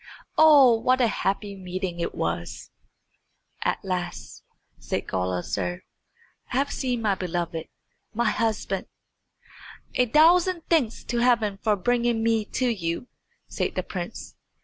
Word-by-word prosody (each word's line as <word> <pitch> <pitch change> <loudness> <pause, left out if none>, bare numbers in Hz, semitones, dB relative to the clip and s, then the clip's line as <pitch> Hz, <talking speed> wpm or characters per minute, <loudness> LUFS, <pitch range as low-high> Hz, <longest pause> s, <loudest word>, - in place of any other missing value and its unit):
Oh, 280 -7 +7
what 255 +3 +2
a 250 - +4
happy 200 -2 -1
meeting 185 -1 -5
it 170 - -3
was! 85 +1 -4 0.9
"At - - -1
last," 180 -2 -4 0.4
said - - -3
Gulizar, 90 0 -2 0.7
"I - - 0
have 280 +1 +1
seen 250 -3 -2
my 205 -2 +3
beloved, 170 -3 -3 0.4
my 235 +2 +1
husband." 210 -4 -1 1.1
"A 250 - +2
thousand 335 +6 +4
thanks 265 -9 +2
to 240 - -2
Heaven 230 -5 +2
for 215 -2 +2
bringing 235 +2 +1
me 225 -2 +2
to 255 +4 -1
you," 185 0 -2 0.4
said - - -2
the - - -1
prince. - - -7
220 Hz, 125 wpm, -25 LUFS, 180-245 Hz, 1.1 s, Oh